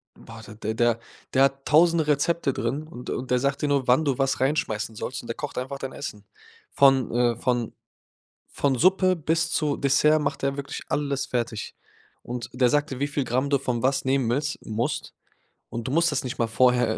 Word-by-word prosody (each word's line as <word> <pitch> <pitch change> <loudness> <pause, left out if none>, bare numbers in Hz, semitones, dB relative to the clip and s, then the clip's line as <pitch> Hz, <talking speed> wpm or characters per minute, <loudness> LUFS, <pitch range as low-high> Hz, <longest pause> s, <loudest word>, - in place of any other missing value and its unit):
boah, 115 -1 -12
d 110 +1 -5
der 120 0 +2 0.3
der 135 0 +5
hat 135 0 +1
1.000 165 +1 +4
Rezepte 150 0 +1
drin 130 +6 -2
und 125 -6 -9
und 130 - -4
der 125 - +3
sagt 140 +1 -1
dir 150 - +1
nur, 140 -3 +1
wann 130 +6 +4
du 135 -3 +1
was 135 -1 0
reinschmeißen 115 -6 -1
sollst 125 +3 -5
und 120 - -12
der 115 - -4
kocht 145 - -6
einfach 135 +2 -5
dein 135 -1 -5
Essen. 105 -7 -7 0.5
Von 135 -3 +4
äh, 120 -1 +2
von 120 -1 -1 0.8
von 140 -2 0
Suppe 185 +4 +4
bis 165 +1 0
zu 150 -3 0
Dessert 145 +3 +3
macht 140 - -2
er 135 0 0
wirklich 140 -1 -5
alles 140 -2 -1
fertig. 120 -4 -3 0.5
Und 120 -1 -6
der 125 0 +3
sagt 145 +1 +1
dir, 130 - -5
wie 145 - +1
viel 140 -2 -1
Gramm 130 +4 0
du 140 - +3
von 125 -3 -2
was 135 +1 +1
nehmen 130 -2 +1
willst 145 +3 -1
musst 110 +2 -3 0.6
und 120 +2 -5
du - - -2
musst 170 +1 +3
das 140 -2 -1
nicht 125 - -5
mal 115 - +2
vorher 125 -1 +3
135 Hz, 205 wpm, -25 LUFS, 120-145 Hz, 0.8 s, der